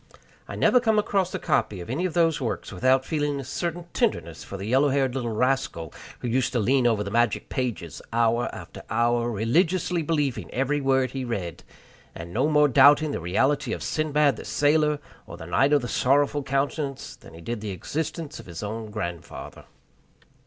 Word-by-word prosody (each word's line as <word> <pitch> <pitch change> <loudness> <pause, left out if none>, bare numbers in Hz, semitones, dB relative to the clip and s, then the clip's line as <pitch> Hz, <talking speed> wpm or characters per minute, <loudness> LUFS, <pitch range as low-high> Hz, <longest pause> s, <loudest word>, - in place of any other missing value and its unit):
I - - -6
never 250 - +4
come 220 -3 +2
across 195 -3 +1
a - - 0
copy 105 -5 0
of 85 - -8
any 150 +10 -1
of 180 - -8
those 165 -3 +2
works 120 - -3
without 130 +7 +2
feeling 145 -2 -1
a - - -5
certain 170 +6 -4
tenderness - - -1
for 100 - -7
the 95 - -6
yellow 135 +6 +3
haired 135 -2 +1
little 125 -3 -2
rascal 110 - -1 0.3
who - - -3
used 125 +2 0
to 120 - +1
lean 125 +3 +3
above 110 -3 +1
the 100 - -5
magic 120 +1 +1
pages 120 - -3
hour 115 +1 +2
after - - -10
hour, 120 +2 +1
religiously 165 - +1
believing 150 -5 -1
every 145 +3 0
word 135 -2 +2
he 135 -1 -4
read, 95 -9 -4 0.5
and 85 +1 -8
no 130 +7 +2
more 150 -1 +5
doubting 145 +3 +6
the - - -3
reality 130 - +1
of - - -5
Sindbad 150 -4 +1
the - - -8
Sailor, 150 0 +2 0.3
or - - -9
the 80 - -9
Knight 135 - +2
of 145 -3 +3
the - - -3
Sorrowful 145 +4 +2
Countenance, 140 +1 -2
than - - -15
he 85 - -11
did 115 +4 -4
the 105 - -4
existence 150 - -4
of - - -12
his 85 +2 -7
own 110 +1 -5
grandfather. 85 -6 -6
130 Hz, 190 wpm, -25 LUFS, 115-145 Hz, 0.5 s, doubting